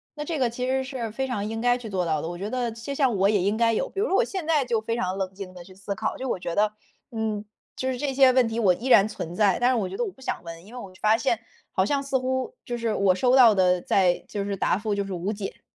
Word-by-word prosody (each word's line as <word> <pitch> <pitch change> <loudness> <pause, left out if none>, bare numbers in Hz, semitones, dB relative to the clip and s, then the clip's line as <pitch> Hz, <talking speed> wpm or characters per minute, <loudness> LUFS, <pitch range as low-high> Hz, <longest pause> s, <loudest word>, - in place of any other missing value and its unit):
那 295 - -4
这 320 0 -2
个 250 -3 +2
其 250 +2 -4
实 265 0 +1
是 255 -5 -5
非 265 +4 -2
常 210 -6 -2
应 225 +1 -4
该 245 0 +3
去 240 -3 -8
做 185 -3 -1
到 155 -2 0
的， 160 - -4
我 175 - -6
觉 200 +3 -4
得 245 -1 -1
就 230 +5 -6
像 270 -5 +2
我 195 +1 +4
也 205 -3 +2
应 200 +4 +1
该 230 0 +3
有。 - - -1
比 390 - -6
如 440 - +1
说 390 - +1
我 470 - +4
现 380 -7 -4
在 305 -4 +3
就 235 -2 +1
非 230 +1 -2
常 185 -4 -2
冷 190 -1 -3
静 190 -1 -8
地 180 - -10
去 185 - -14
思 195 +1 -5
考， - - -2
就 265 - -4
我 - - 0
觉 170 -1 -4
得， 210 0 +3 0.4
嗯， 220 -2 -2 0.3
就 260 - -2
是 255 - -3
这 280 0 -2
些 265 -1 +6
问 255 -2 +4
题 225 +1 -3
我 195 -5 +4
依 230 +8 -8
然 205 -6 +7
存 190 -6 -6
在， 200 -3 +3
但 245 - +3
是 255 - +2
我 205 -6 -1
觉 - - -6
得 485 - 0
我 395 - -5
不 265 - -21
想 - - -3
问， 165 0 -9
因 220 - -14
为 - - -6
我 195 -5 -9
发 215 +1 +4
现 240 -2 0 0.3
好 190 - +1
像 280 +4 0
似 275 -1 0
乎 260 - -2
就 240 -1 -3
是 230 -2 -1
我 195 -2 +3
收 250 +6 +2
到 245 -5 +7
的 180 -1 +3
在 180 -2 +2
就 205 -2 -3
是 200 0 -3
答 180 - +1
复 210 +1 -2
就 200 0 -1
是 195 - -5
无 180 +3 -2
解。 205 -2 -6
225 Hz, 335 characters per minute, -25 LUFS, 195-255 Hz, 0.4 s, 然